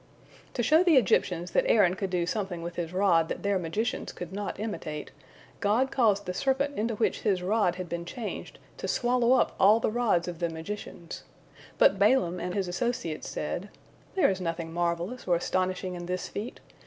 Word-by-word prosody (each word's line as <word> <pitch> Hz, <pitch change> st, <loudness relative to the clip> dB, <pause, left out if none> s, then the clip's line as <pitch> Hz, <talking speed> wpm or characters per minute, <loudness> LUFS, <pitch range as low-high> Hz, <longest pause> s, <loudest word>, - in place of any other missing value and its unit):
To 240 Hz, -, 0 dB
show 310 Hz, +9 st, +5 dB
the 340 Hz, -6 st, +5 dB
Egyptians 180 Hz, -6 st, +2 dB
that -, -, +3 dB
Aaron 195 Hz, -5 st, +5 dB
could 195 Hz, 0 st, -3 dB
do 180 Hz, -2 st, 0 dB
something 180 Hz, -2 st, -3 dB
with 170 Hz, 0 st, -5 dB
his 170 Hz, -2 st, -3 dB
rod 180 Hz, -4 st, +3 dB
that -, -, -4 dB
their 200 Hz, -1 st, +1 dB
magicians 185 Hz, +7 st, -2 dB
could 175 Hz, +1 st, -8 dB
not 200 Hz, 0 st, -4 dB
imitate, 180 Hz, -8 st, -5 dB, 0.5 s
God 225 Hz, +5 st, +2 dB
caused 210 Hz, -5 st, +2 dB
the 180 Hz, -, -3 dB
serpent 275 Hz, +7 st, 0 dB
into 225 Hz, +1 st, -1 dB
which 220 Hz, -, 0 dB
His 190 Hz, -4 st, +1 dB
rod 195 Hz, -2 st, +2 dB
had 180 Hz, -1 st, -5 dB
been 170 Hz, 0 st, -4 dB
changed 215 Hz, +6 st, -6 dB, 0.2 s
to -, -, -4 dB
swallow 245 Hz, 0 st, +2 dB
up -, -, +3 dB
all 210 Hz, +4 st, +6 dB
the 220 Hz, -, 0 dB
rods 220 Hz, -7 st, +1 dB
of 175 Hz, -2 st, -5 dB
the 170 Hz, -1 st, 0 dB
magicians. 170 Hz, +1 st, -7 dB, 0.5 s
But 195 Hz, -, +5 dB
Balaam 200 Hz, -5 st, +3 dB
and 180 Hz, +1 st, -3 dB
his 195 Hz, -2 st, 0 dB
associates 175 Hz, -4 st, -2 dB
said: 180 Hz, +6 st, -4 dB, 0.5 s
"There 345 Hz, -, +4 dB
is 190 Hz, -1 st, -4 dB
nothing 165 Hz, -1 st, -3 dB
marvellous 175 Hz, +7 st, -2 dB
or 175 Hz, -, +4 dB
astonishing 185 Hz, +1 st, -1 dB
in 175 Hz, -1 st, -6 dB
this 180 Hz, 0 st, -3 dB
feat. 215 Hz, +4 st, -6 dB
190 Hz, 190 wpm, -28 LUFS, 175-225 Hz, 0.5 s, all